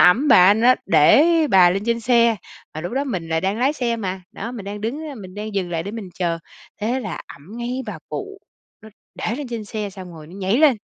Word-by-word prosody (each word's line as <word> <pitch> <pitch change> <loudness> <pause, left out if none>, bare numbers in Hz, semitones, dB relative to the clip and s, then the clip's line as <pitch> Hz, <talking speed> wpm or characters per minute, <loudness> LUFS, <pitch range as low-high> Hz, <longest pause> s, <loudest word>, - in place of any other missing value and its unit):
ẵm 230 +12 +5
bà, 185 +3 +7
nó 240 +3 +5
để 165 - +6 0.3
bà 180 -2 +7
lên 195 +2 -1
trên 235 0 +1
xe. 235 -1 +3 0.4
Mà 155 - -4
lúc 175 +7 -5
đó 275 +2 0
mình 180 -11 -4
lại 160 0 0
đang 195 +4 -1
lái 265 +4 +2
xe 240 -5 -1
mà, 190 -3 -4
đó, 230 +4 -6
mình 220 -6 -7
đang 205 +1 -6
đứng 235 +8 -3
á, 285 - -7
mình 190 -4 -10
đang 210 0 -6
dừng 185 -3 -1
lại 165 -1 -2
để 200 - -6
mình 220 -4 -7
chờ. 170 -2 -1 0.4
Thế 240 +5 -1
là 215 -7 -5
ẵm 180 +11 -12
ngay 245 +2 -3
bà 200 -7 -6
cụ, 400 0 -6 0.4
nó 220 - -12 0.3
để 225 - -3
lên 285 -3 -6
trên 230 -3 -5
xe 210 -1 -4
xong 185 -2 -10
rồi 155 -2 -11
nó 175 - -13
nhảy 195 +4 0
lên, 290 -6 +5
210 Hz, 250 wpm, -21 LUFS, 185-240 Hz, 0.4 s, bà